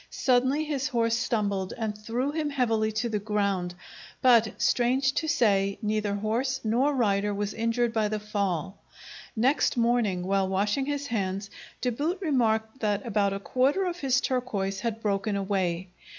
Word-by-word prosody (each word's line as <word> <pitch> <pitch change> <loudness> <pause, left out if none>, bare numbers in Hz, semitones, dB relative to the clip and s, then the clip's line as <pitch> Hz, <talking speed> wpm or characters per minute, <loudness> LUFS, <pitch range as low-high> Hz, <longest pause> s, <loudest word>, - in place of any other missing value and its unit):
Suddenly 260 +4 +2
his 295 -2 -2
horse 230 -3 +1
stumbled 200 -5 -1
and 220 -2 -2
threw 230 +6 -2
him 305 -1 -1
heavily 225 -6 +1
to 225 +3 -1
the 210 -2 -1
ground, 200 -4 -1 0.4
but, 235 -4 +4
strange 250 +3 +2
to 320 - -1
say, 200 -8 +2
neither 210 -1 0
horse 235 +6 -1
nor 250 +6 +2
rider 205 -4 +1
was 205 0 -2
injured 230 +1 0
by 220 -2 +1
the 215 0 -2
fall. 200 -4 -2 0.6
Next 255 +4 +2
morning, 230 -6 +1
while 195 0 +1
washing 205 +8 0
his 285 -1 -2
hands, 200 -4 -2 0.3
De 250 - +1
Boot 305 - -1
remarked 230 - 0
that 210 0 -1
about 205 -3 +1
a 195 - -3
quarter 270 - +1
of 355 -1 -3
his 270 -3 +2
turquoise 205 -7 -2
had 225 +1 -3
broken 200 0 0
away. 190 -3 -1
220 Hz, 160 wpm, -27 LUFS, 200-255 Hz, 0.6 s, but